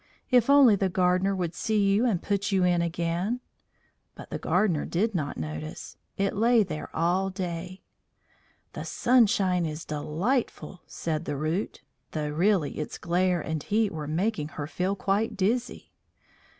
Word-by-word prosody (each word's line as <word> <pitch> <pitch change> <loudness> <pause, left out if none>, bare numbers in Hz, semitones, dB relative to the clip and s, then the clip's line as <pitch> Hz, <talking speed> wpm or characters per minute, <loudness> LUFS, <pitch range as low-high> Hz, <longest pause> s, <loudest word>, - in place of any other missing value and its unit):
"If 245 0 +4
only 275 -6 +7
the 195 -1 0
gardener 185 +2 +2
would 175 -3 -2
see 220 -1 -1 0.2
you 225 +5 +3
and 190 -7 0
put 200 0 -1
you 190 -2 +3
in 175 -1 +3
again!" 170 +7 -1 0.8
But - - -11
the - - -3
gardener 175 -9 +1
did 210 +6 0
not 150 -6 -2
notice; 75 0 -6 0.2
it 195 0 0
lay 230 +2 +4
there 155 -5 -6
all 180 +4 +1
day. 180 0 -5 0.9
"The - - -5
sunshine 200 -7 +3
is 155 0 -4
delightful," 175 - -2
said 155 -2 -3
the 145 - -3
Root, 160 +7 -2 0.3
though 150 -1 -2
really 170 0 +1
its 150 - -4
glare 180 0 +1
and 160 -1 -3
heat 215 +3 +1
were 155 -3 -5
making 165 0 -1
her 145 - -2
feel 180 +5 -2
quite 205 +3 -1
dizzy. 235 +6 -1
185 Hz, 150 wpm, -27 LUFS, 160-205 Hz, 0.9 s, only